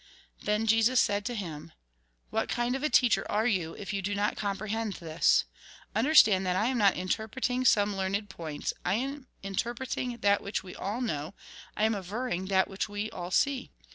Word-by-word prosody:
Then 210 +1 0
Jesus 225 +3 +4
said 205 0 +1
to 245 - -2
him: 165 -8 -6 0.3
" - - -43
What - - -1
kind 240 +1 0
of 270 - -3
a 305 - +1
teacher 245 -6 +4
are 215 +2 +1
you, 185 -9 0
if 200 0 -6
you 200 - -1
do 205 +2 -2
not 205 +1 0
comprehend 210 +1 -2
this? 165 -2 +2 0.5
Understand 220 -7 +6
that 180 - +1
I 215 +6 +2
am 260 - 0
not 200 -2 +5
interpreting 230 +7 -1
some 205 -3 +4
learned 195 +2 -1
points, 160 -6 -4
I 180 - +1
am 270 +3 -3 0.2
interpreting 240 +4 -3
that 200 0 +3
which 200 - -3
we 185 - -9
all 210 +6 -3
know, 155 - -3 0.4
I 210 - +1
am 220 +1 +3
averring 195 0 -3
that 190 -1 +3
which 195 +2 -3
we 205 +1 -4
all 175 0 -6
see. 270 +7 +1
205 Hz, 190 wpm, -29 LUFS, 190-235 Hz, 0.5 s, Understand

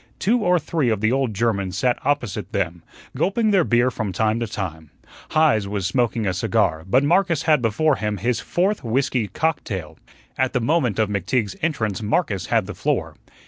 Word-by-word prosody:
Two 230 +5 +2
or 180 -4 +3
three 155 -4 0
of 110 -3 0
the 110 +2 +1
old 135 -2 +1
Germans 100 -4 -1
sat 125 +4 +1
opposite 135 -7 -2
them, 85 0 -2 0.3
gulping 215 +3 +1
their 190 -3 +4
beer 120 -2 +2
from 110 -5 -3
time 110 +4 0
to 115 - -2
time. 80 -7 -6 0.4
Heise 145 -10 +3
was 100 -2 -3
smoking 120 -1 0
a 95 - 0
cigar, 80 -3 0
but 130 +7 +4
Marcus 170 0 +2
had 155 -4 +3
before 135 +6 +2
him 105 -1 -2
his 120 +5 0
fourth 195 +4 -1
whiskey 125 -1 0
cocktail. 100 - -3 0.4
At 130 0 +1
the 125 - +2
moment 125 - +1
of 110 - +2
McTeague's 100 +2 -1
entrance 115 - -1
Marcus 105 - -1
had - - +2
the - - -6
floor. - - -2
120 Hz, 185 wpm, -22 LUFS, 100-150 Hz, 0.4 s, their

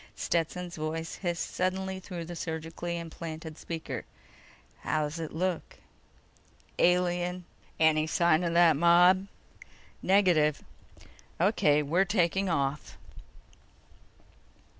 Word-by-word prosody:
Stetson's 175 +1 -2
voice 160 +1 -4
hissed 175 -3 -3
suddenly 190 +1 -2
through 180 -3 -7
the 175 +1 -7
surgically 165 +1 -4
implanted 160 -1 -7
speaker: 165 -1 -5 0.8
"How's 155 +1 -2
it 160 -2 -5
look?" 180 +1 -3 1.0
"Alien." 180 0 +1 0.3
"Any 155 -1 +3
sign 170 +1 +2
of 170 -1 -1
that 170 -2 +6
mob?" 175 +4 +5 0.7
"Negative." 175 -7 +3 0.8
"O.K. 150 0 +3
We're 170 +7 +2
taking 195 -1 +1
off." 140 -3 -2
170 Hz, 95 wpm, -29 LUFS, 160-180 Hz, 1.0 s, that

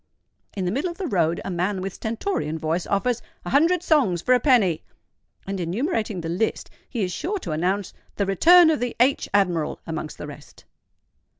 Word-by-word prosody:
In 190 - -1
the 180 - 0
middle 280 - -1
of 340 - -8
the 390 - -3
road 170 - +1
a - - -3
man 185 +3 -1
with 190 0 -4
stentorian 220 - -3
voice 160 +3 -2
offers 240 +4 0 0.2
"A - - -4
hundred 330 +5 +3
songs 260 - +2
for 255 - +4
a 250 - +4
penny;" 210 - +3 0.6
and, 195 0 -4
enumerating 215 - -2
the 165 - -5
list, 180 +7 -2 0.2
he 230 -5 -2
is 180 -1 -2
sure 405 +5 -2
to 350 - -6
announce 185 +5 -1 0.2
the 200 - 0
"Return 325 - +6
of 310 - 0
the 245 -1 -3
_H_admiral" 195 - +1
amongst 160 -2 -5
the - - -7
rest. 145 0 -12
200 Hz, 185 wpm, -24 LUFS, 175-265 Hz, 0.6 s, Return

